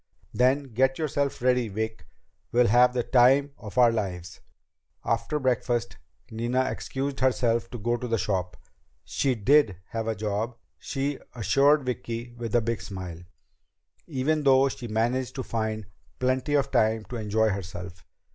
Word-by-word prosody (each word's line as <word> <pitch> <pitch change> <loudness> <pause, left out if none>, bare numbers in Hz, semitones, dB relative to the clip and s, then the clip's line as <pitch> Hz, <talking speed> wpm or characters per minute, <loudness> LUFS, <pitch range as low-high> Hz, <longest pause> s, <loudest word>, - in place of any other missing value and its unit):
"Then 130 +3 +3
get 130 +3 +2
yourself 145 -4 -1
ready, 125 -2 +3
Vic. 110 -5 -4 0.4
We'll 120 +1 +4
have 125 +3 +5
the 120 - +1
time 135 +4 +4
of 105 +2 -10
our 120 -2 +6
lives!" 90 -6 -4 0.7
After 115 +6 0
breakfast, 120 -3 0 0.3
Nina 120 +3 0
excused 135 +1 -4
herself 120 -3 +1
to 120 - -6
go 120 +2 0
to 125 - -5
the 115 -1 +1
shop. 90 -2 -2 0.5
She 135 -3 0
did 115 - +3
have 115 -1 -3
a 110 - 0
job, 110 +3 -3 0.2
she 140 0 -3 0.2
assured 140 +5 +3
Vicki 120 -1 -4
with 120 -1 -4
a 120 - +5
big 115 0 -2
smile, 90 -4 -7 0.9
even 150 +1 0
though 135 -1 +5
she 125 -2 -7
managed 120 +4 -1
to 130 - -3
find 110 -2 -3 0.3
plenty 130 +3 0
of 140 - +1
time 110 0 +2
to 125 - -4
enjoy 110 0 +1
herself. 90 -2 -6
120 Hz, 150 wpm, -26 LUFS, 110-130 Hz, 0.9 s, our